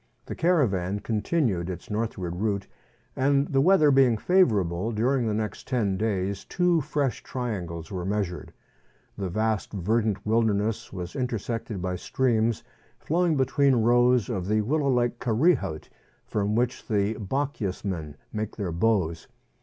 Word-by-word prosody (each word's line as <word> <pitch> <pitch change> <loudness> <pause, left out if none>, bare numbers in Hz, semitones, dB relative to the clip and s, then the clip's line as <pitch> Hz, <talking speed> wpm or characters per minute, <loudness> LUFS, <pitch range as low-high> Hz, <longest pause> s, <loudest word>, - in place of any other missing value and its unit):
The - - -5
caravan 105 - +1
continued 105 - 0
its 90 +3 -7
northward 105 -5 -2
route, 100 0 -1 0.5
and 140 +1 +2
the 135 -1 +3
weather 160 -2 +5
being 130 -4 +4
favourable, 105 - +2
during 120 +3 +1
the 110 - 0
next 105 -2 -4
ten 110 -7 0
days 100 -1 -1
two 180 -2 +1
fresh 145 -3 -1
triangles 90 -10 -5
were 90 -2 -3
measured. 95 -2 -3 0.6
The 95 -2 -3
vast 110 +2 -1
verdant 105 +1 0
wilderness 110 -1 +1
was 90 -2 -6
intersected 115 -5 -3
by 90 -1 -2
streams 115 0 0 0.3
flowing 170 -1 +1
between 135 0 +3
rows 120 0 +4
of 95 -6 -3
the 110 +1 +2
willow 140 +5 0
like 120 -2 +1
"karree 130 +8 +3
hout," 80 -7 -6 0.4
from 105 0 -1
which 120 +2 -1
the 105 -1 +1
Bochjesmen 100 - -3 0.2
make 110 -1 -3
their 100 -5 -3
bows. 85 -3 0
110 Hz, 140 wpm, -26 LUFS, 95-130 Hz, 0.6 s, weather